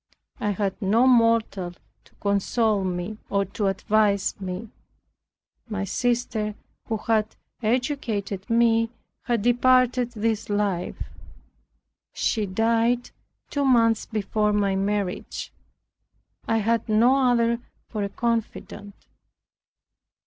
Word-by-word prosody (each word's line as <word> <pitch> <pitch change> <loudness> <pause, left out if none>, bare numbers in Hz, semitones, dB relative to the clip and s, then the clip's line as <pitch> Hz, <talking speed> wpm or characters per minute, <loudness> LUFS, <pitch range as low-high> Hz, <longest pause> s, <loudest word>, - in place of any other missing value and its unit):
I 210 - -1
had 200 0 -2
no 215 +5 +3
mortal 230 -7 +3 0.3
to - - -24
console 205 +1 +1
me, 185 +3 -3
or 200 0 +1
to 200 +2 -2
advise 200 +1 +1
me. 190 +4 -5 1.0
My 205 -2 -2
sister, 220 0 -1 0.3
who 220 - -1
had 215 0 0 0.3
educated 220 -5 -2
me, 230 -1 +3 0.4
had 235 -4 0
departed 250 0 +3
this 220 -1 -1
life. 205 -4 -1 1.1
She 215 -3 0
died 230 +4 +1 0.4
two 285 - 0
months 230 -4 +3
before 210 0 0
my 200 -2 +1
marriage. 195 -1 -2 0.9
I 225 - +2
had 225 +1 0
no 250 +4 +4
other 235 -1 +2 0.3
for 215 - -4
a 200 - -2
confidant. 215 -2 -3
220 Hz, 105 wpm, -25 LUFS, 200-235 Hz, 1.1 s, no